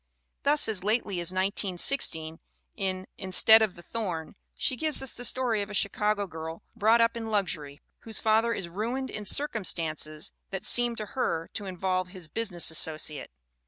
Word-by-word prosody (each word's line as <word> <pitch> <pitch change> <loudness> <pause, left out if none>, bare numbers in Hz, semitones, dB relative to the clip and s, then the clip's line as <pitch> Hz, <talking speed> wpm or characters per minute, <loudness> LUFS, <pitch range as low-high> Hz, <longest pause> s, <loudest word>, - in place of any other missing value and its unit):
Thus 295 +1 +2
as 210 -5 -1
lately 210 -3 -1
as 175 0 -1
1916, 185 - +1 0.4
in 185 -1 -3
Instead 220 +4 +6
of 215 -4 0
the 175 - -13
Thorn, 175 -8 -5 0.2
she 255 - 0
gives 310 +3 +1
us 270 - -4
the 245 - -9
story 245 -4 +2
of 200 - -5
a 210 - -6
Chicago 205 +1 0
girl 160 -2 -8
brought 225 +1 +4
up 230 0 +2
in 225 -1 -5
luxury, 170 -9 -3 0.2
whose 225 -1 -5
father 220 +1 +2
is 195 -5 -4
ruined 235 +9 -4
in 210 -1 -6
circumstances 165 - 0 0.2
that 190 -1 -6
seem 240 -1 +6
to 215 - -4
her 165 -11 -2
to 205 - -5
involve 185 0 -2
his 180 -3 -10
business 190 -5 0
associate. 155 -2 +2
200 Hz, 165 wpm, -27 LUFS, 175-225 Hz, 0.4 s, Instead